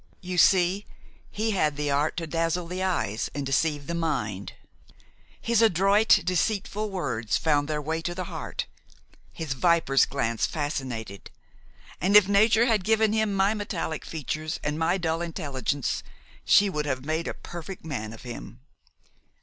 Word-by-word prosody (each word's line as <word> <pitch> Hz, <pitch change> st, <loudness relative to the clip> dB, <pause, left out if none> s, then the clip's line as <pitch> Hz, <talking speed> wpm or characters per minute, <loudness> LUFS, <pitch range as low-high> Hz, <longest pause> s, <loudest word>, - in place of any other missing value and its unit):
You 180 Hz, -1 st, -2 dB
see, 185 Hz, +3 st, +4 dB, 0.4 s
he 220 Hz, +1 st, -1 dB
had 155 Hz, -7 st, +1 dB
the 145 Hz, -1 st, -1 dB
art 145 Hz, +2 st, +1 dB
to 170 Hz, -, -2 dB
dazzle 165 Hz, +2 st, -1 dB
the 180 Hz, +2 st, -5 dB
eyes 110 Hz, -, -1 dB
and 145 Hz, -1 st, -3 dB
deceive 145 Hz, +2 st, 0 dB
the 170 Hz, -, -4 dB
mind; 110 Hz, -, -2 dB, 0.9 s
his 230 Hz, -1 st, +2 dB
adroit, 205 Hz, +1 st, +4 dB
deceitful 205 Hz, +3 st, -1 dB
words 130 Hz, -, -1 dB
found 145 Hz, -3 st, +1 dB
their 150 Hz, -1 st, -2 dB
way 160 Hz, +2 st, -2 dB
to 175 Hz, +1 st, -3 dB
the 185 Hz, -, -3 dB
heart; -, -, -5 dB, 0.7 s
his 155 Hz, -4 st, -4 dB
viper's 165 Hz, -2 st, +3 dB
glance 115 Hz, -5 st, -1 dB
fascinated; 130 Hz, -, -4 dB, 0.7 s
and 195 Hz, +3 st, +2 dB
if 210 Hz, -3 st, +8 dB
nature 220 Hz, +3 st, +4 dB
had 220 Hz, -5 st, +2 dB
given 220 Hz, +1 st, +3 dB
him 220 Hz, -1 st, +1 dB
my 195 Hz, +2 st, +3 dB
metallic 205 Hz, -7 st, -3 dB
features 155 Hz, 0 st, -4 dB
and 150 Hz, +2 st, -2 dB
my 170 Hz, +3 st, +2 dB
dull 165 Hz, -2 st, -1 dB
intelligence 145 Hz, -5 st, -2 dB, 0.4 s
she 205 Hz, -, +5 dB
would 150 Hz, -6 st, -2 dB
have 130 Hz, -1 st, -2 dB
made 160 Hz, +2 st, -1 dB
a -, -, -4 dB
perfect 175 Hz, +1 st, -9 dB
man 110 Hz, -9 st, -4 dB
of 115 Hz, -, -11 dB
him. 120 Hz, 0 st, -8 dB
165 Hz, 155 wpm, -26 LUFS, 145-190 Hz, 0.9 s, if